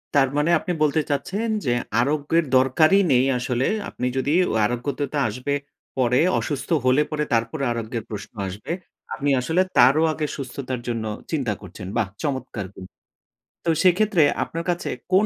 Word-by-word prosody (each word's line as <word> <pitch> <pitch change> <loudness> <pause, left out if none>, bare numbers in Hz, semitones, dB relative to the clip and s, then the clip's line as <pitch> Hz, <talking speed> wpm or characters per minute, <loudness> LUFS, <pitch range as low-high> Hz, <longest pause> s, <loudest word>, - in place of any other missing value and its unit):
তার 135 -2 +5
মানে 150 +3 +2
আপনি 200 - -4
বলতে 155 +1 +2
চাচ্ছেন 195 +10 -1 0.2
যে, 120 - +2 0.3
আরোগ্যের 150 +5 +1
দরকারই 155 +9 +4
নেই 125 +1 +4
আসলে 125 0 0 0.2
আপনি 125 - -4 0.4
ও - - -1
আরোগ্যতা 135 +5 -2
আসবে 125 +6 -3 0.4
পরে 125 0 +3 0.2
অসুস্থ 145 -3 -4 0.2
হলে 130 +3 +4
পরে 150 -1 0
তারপরে 115 +6 0
আরোগ্যের 115 -1 -3
প্রশ্ন 105 -1 -7
আসবে, 100 - -6 0.4
আপনি 145 0 -1
আসলে 160 +8 +2 0.2
তারও 135 +6 +6
আগে 155 - -2
সুস্থতার 130 -1 -5
জন্য 115 -2 -2 0.3
চিন্তা 135 -9 0
করছেন। 90 -2 -9
বাহ! 115 -4 +1 0.2
চমৎকার 130 -8 -3
কি - - -12 0.8
তো - - +1
সেক্ষেত্রে 185 -1 +4 0.2
আপনার 165 +1 -5
কাছে 175 0 -1 0.2
কোন 190 +3 +5
135 Hz, 150 wpm, -23 LUFS, 120-155 Hz, 0.8 s, তারও